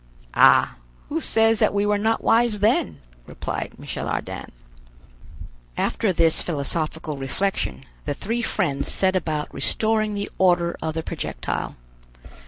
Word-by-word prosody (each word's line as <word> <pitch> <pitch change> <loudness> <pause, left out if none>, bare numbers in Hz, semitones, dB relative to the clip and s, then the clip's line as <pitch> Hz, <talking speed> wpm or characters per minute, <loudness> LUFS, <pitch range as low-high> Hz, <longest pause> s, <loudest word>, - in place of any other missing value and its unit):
"Ah, - - +5 0.3
who 320 +3 -1
says 225 -4 +3
that - - +2
we 200 0 +2
were 205 0 +2
not 225 +2 0
wise 225 -2 +3
then?" 140 - +1 0.3
replied - - -5
Michel - - -5
Ardan. - - -4 1.3
After 215 - +1
this 165 -2 +4
philosophical 155 0 -2
reflection, 135 +4 -2 0.2
the 145 -1 -2
three 230 +9 -2
friends 175 -11 -1
set 190 -1 +1
about 155 -4 -2
restoring 215 -1 0
the 200 0 -4
order 175 -2 +3
of 160 -1 -3
the 160 - -2
projectile. - - -4
190 Hz, 130 wpm, -23 LUFS, 155-215 Hz, 1.3 s, Ah